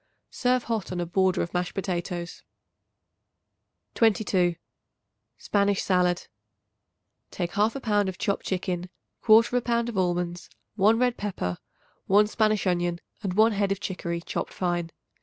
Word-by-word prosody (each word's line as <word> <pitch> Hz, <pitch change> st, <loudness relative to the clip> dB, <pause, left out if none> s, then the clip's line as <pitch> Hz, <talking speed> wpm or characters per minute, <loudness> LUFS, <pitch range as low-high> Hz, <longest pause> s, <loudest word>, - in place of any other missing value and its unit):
Serve 250 Hz, -1 st, +1 dB
hot 220 Hz, -6 st, -3 dB
on 180 Hz, -, -3 dB
a 175 Hz, -, -1 dB
border 185 Hz, +2 st, +1 dB
of 170 Hz, -, -7 dB
mashed 180 Hz, 0 st, -2 dB
potatoes. 180 Hz, -2 st, -4 dB, 1.5 s
22. 195 Hz, -6 st, +2 dB, 0.8 s
Spanish 200 Hz, -1 st, +1 dB
Salad. 180 Hz, -2 st, +1 dB, 1.0 s
Take 175 Hz, -2 st, -3 dB
1/2 215 Hz, +6 st, +1 dB
pound 205 Hz, -3 st, +2 dB
of 185 Hz, -, -7 dB
chopped 200 Hz, -2 st, -2 dB
chicken, 180 Hz, -1 st, -2 dB, 0.4 s
1/4 230 Hz, +2 st, +5 dB
pound 235 Hz, -1 st, 0 dB
of 210 Hz, -5 st, -2 dB
almonds, 175 Hz, -1 st, -1 dB, 0.2 s
1 215 Hz, +2 st, +4 dB
red 245 Hz, 0 st, +1 dB
pepper, 180 Hz, -, -3 dB, 0.5 s
1 205 Hz, +2 st, +5 dB
Spanish 215 Hz, -1 st, +1 dB
onion 175 Hz, -1 st, 0 dB, 0.2 s
and 190 Hz, -3 st, -3 dB
1 220 Hz, +2 st, +5 dB
head 200 Hz, -1 st, 0 dB
of 195 Hz, -, -1 dB
chicory 170 Hz, -4 st, -4 dB
chopped -, -, -4 dB
fine. 175 Hz, -2 st, -1 dB
195 Hz, 135 wpm, -26 LUFS, 175-215 Hz, 1.5 s, 1/4